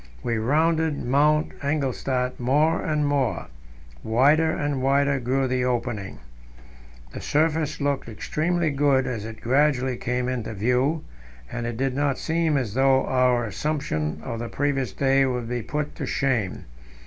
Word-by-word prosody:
We 115 -2 -1
rounded 160 +5 +1
Mount 150 +4 +3
Engelstad 135 -3 -1
more 150 +6 +2
and 150 -1 0
more; 140 -4 0 0.6
wider 145 +8 +3
and 145 -3 -1
wider 140 +1 +2
grew 130 +2 0
the 125 0 0
opening. 115 -5 -2 1.0
The - - -6
surface 155 0 0
looked 140 -4 -1
extremely 160 +8 -1
good 140 -2 +2
as 115 -5 -4
it 110 0 -9
gradually 130 -1 +2
came 125 0 -2
into 120 -4 -3
view, 125 +9 +1 0.5
and 115 - -3
it 120 -1 -4
did 135 0 0
not 140 -1 0
seem 160 -2 0
as 120 -7 -2
though 135 +1 +3
our 125 -2 +2
assumption 105 - -2
of 115 - -4
the 120 0 -4
previous 135 -5 -1
day 135 +5 +2
would 125 -2 -2
be 120 0 -2
put 150 +5 -3
to - - -4
shame. 125 -9 -1
135 Hz, 150 wpm, -24 LUFS, 125-145 Hz, 1.0 s, Mount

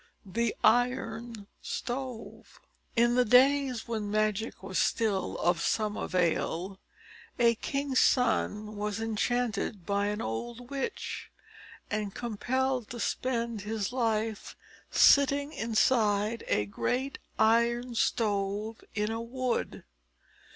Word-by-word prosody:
THE 230 +4 -1
IRON 230 -2 +1 0.2
STOVE. 250 -2 -6 0.4
In 235 0 +4
the 250 0 +4
days 255 0 +4
when 220 -3 -3
magic 215 0 -1
was 190 -1 -2
still 210 -4 0
of 175 0 +1
some 215 +2 0
avail, 180 +1 -1 0.6
a 235 -1 +5
king's 275 +3 -1
son 215 -4 +2
was 210 +1 -2
enchanted 225 -3 -1
by 200 +1 0
an 210 +1 -2
old 240 - -5
witch, 275 -1 -4 0.6
and 205 -2 -2
compelled 250 +2 -1
to 240 - -6
spend 235 -3 -1
his 210 +1 -3
life 225 -3 -1 0.3
sitting 280 +1 +5
inside 220 -1 +1
a 105 - +1
great 245 - -2 0.2
Iron 235 +2 +3
Stove 210 -1 -1
in 210 0 0
a 225 0 -3
wood. 250 +1 -2
225 Hz, 110 wpm, -29 LUFS, 210-245 Hz, 0.6 s, a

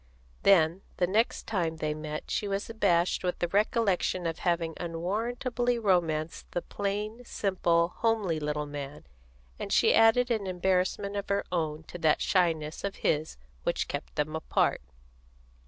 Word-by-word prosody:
Then, 175 -2 +4 0.2
the 180 - +3
next 215 +6 +1
time 170 -6 -1
they 155 -1 -1
met 155 0 -6
she 205 - -1
was 200 0 -2
abashed 185 -6 +2
with 180 -1 -1
the 175 - 0
recollection 200 -3 +1
of 165 -1 -2
having 170 -2 0
unwarrantably 230 +8 -1
romanced 165 -7 0
the 175 - -1
plain, 210 +4 -3
simple, 175 -6 +1
homely 215 -8 +1
little 150 0 -2
man, 145 - -7 0.5
and - - -5
she - - +5
added 235 +2 +5
an 215 -4 0
embarrassment 185 +2 0
of 200 0 -4
her 200 0 +1
own 160 -3 -1
to 175 - -9
that 155 -2 +3
shyness 165 -4 +1
of 200 0 -2
his 155 - +1 0.2
which - - -1
kept - - -5
them 155 +1 -1
apart. 160 - +1
180 Hz, 150 wpm, -29 LUFS, 160-205 Hz, 0.5 s, she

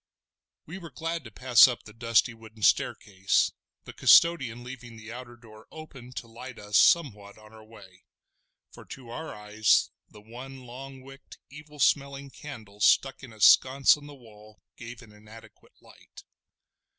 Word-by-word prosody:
We 175 +5 -9
were 170 -3 -10
glad 165 +3 -5
to 110 - -11
pass 125 +2 +5
up 125 -2 -5
the 105 - -14
dusty 115 +1 +1
wooden 110 -1 -14
staircase, 95 -1 +1 0.3
the - - -12
custodian 135 -9 +4
leaving 125 -2 -11
the 110 +1 -11
outer 120 -1 -10
door 110 -2 -17
open 135 -6 -12
to 120 - -8
light 120 +2 -11
us 105 0 -7
somewhat 105 -12 +2
on 110 0 -18
our 110 0 -15
way; 100 -4 -18 0.7
for - - -14
to 125 -3 -12
our 160 +7 -7
eyes 105 +1 +1 0.2
the 105 - -16
one 125 +5 -11
long 130 +2 -11
wick'd, 135 +1 -15
evil 150 +1 -14
smelling 140 0 0
candle 110 -10 -12
stuck 135 +5 +2
in 130 -4 -12
a 110 - -17
sconce 130 +7 +5
on 145 -1 -14
the 145 - -12
wall 110 -4 -18 0.2
gave 120 0 -11
an 110 - -17
inadequate 105 +2 -17
light. - - -18
120 Hz, 165 wpm, -27 LUFS, 110-135 Hz, 0.7 s, pass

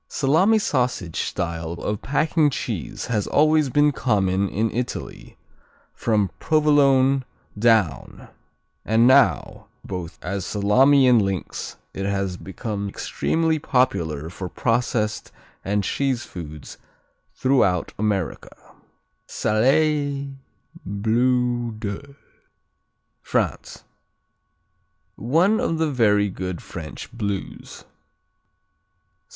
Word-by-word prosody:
Salami 160 +11 +3
sausage 125 - -1
style 85 -1 -3
of 105 +4 -4
packing 155 +2 +2
cheese 110 - -4
has 110 -5 -1
always 155 -1 +3
been 145 +3 +3
common 100 -7 0
in 110 +2 -1
Italy, 125 +1 -5 0.6
from 105 -4 0
Provolone 140 -3 +3 0.3
down, 105 - +1 0.6
and 110 +2 +3
now 130 0 +3 0.2
both 90 -4 -6
as 95 +2 -3
salami 130 +8 +4
and 120 -3 +5
links 95 -3 -4 0.2
it 95 0 -3
has 100 -2 -1
became 100 +2 -5
extremely 160 +9 -1
popular 85 - 0
for 90 0 -6
processed 115 -2 -1 0.3
and 100 +1 0
cheese 130 +3 -1
foods 75 -4 -9 0.6
throughout 110 -10 +1
America. 100 -5 -2 0.7
Salers, 140 +4 +1 0.5
Bleu 120 +3 0
de 110 +7 -6 1.1
France - - -2 1.3
One 170 - +2
of 165 - -1
the 160 -1 0
very 105 -5 +3
good 90 -1 -5
French 80 -3 -9
Blues. 100 -4 -5
115 Hz, 90 wpm, -23 LUFS, 100-140 Hz, 1.3 s, and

